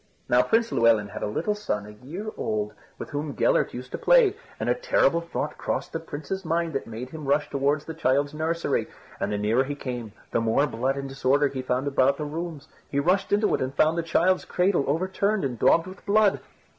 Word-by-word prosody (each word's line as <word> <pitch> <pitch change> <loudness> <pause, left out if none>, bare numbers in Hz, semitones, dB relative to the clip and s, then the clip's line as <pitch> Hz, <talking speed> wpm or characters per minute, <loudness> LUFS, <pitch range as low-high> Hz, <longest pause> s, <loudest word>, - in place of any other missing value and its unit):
Now 125 +1 +5
Prince 225 - +1
Llewelyn 115 -3 +3
had - - -7
a - - -1
little 165 - -1
son 105 - -3
a 105 - -10
year 155 - -7
old 105 -1 -2 0.2
with - - -8
whom 145 0 -3
Gellert - - +2
used 125 +1 -8
to - - -4
play, 480 -5 +5 0.2
and - - -2
a - - +4
terrible - - +2
thought 170 - -4
crossed - - -3
the 165 - -1
Prince's 165 +4 -5
mind 165 0 -1
that 135 - -3
made 115 +3 -7
him 155 -2 -7
rush 145 +2 +1
towards 140 +2 +1
the 160 - -6
child's 145 -1 +1
nursery. 160 +2 -1 0.3
And 100 - -1
the 105 - 0
nearer 110 +5 +2
he 145 +1 -4
came 125 -6 -5 0.2
the - - +1
more 115 +5 +2
blood 130 +1 -1
and 140 0 -4
disorder 135 +1 +2
he 130 -1 -4
found 130 +2 -1
about 140 0 +3
the 150 - -3
rooms. 160 -1 -5 0.2
He 140 - 0
rushed 185 +6 +1
into 210 +1 +3
it - - 0
and 130 +1 -2
found 155 +1 +3
the 170 - 0
child's 175 +3 +2
cradle 180 -5 +1
overturned 190 +5 0
and 125 -4 -3
daubed 165 - +4
with 185 +1 -11
blood. 210 -1 +4
145 Hz, 220 wpm, -26 LUFS, 130-170 Hz, 0.3 s, Now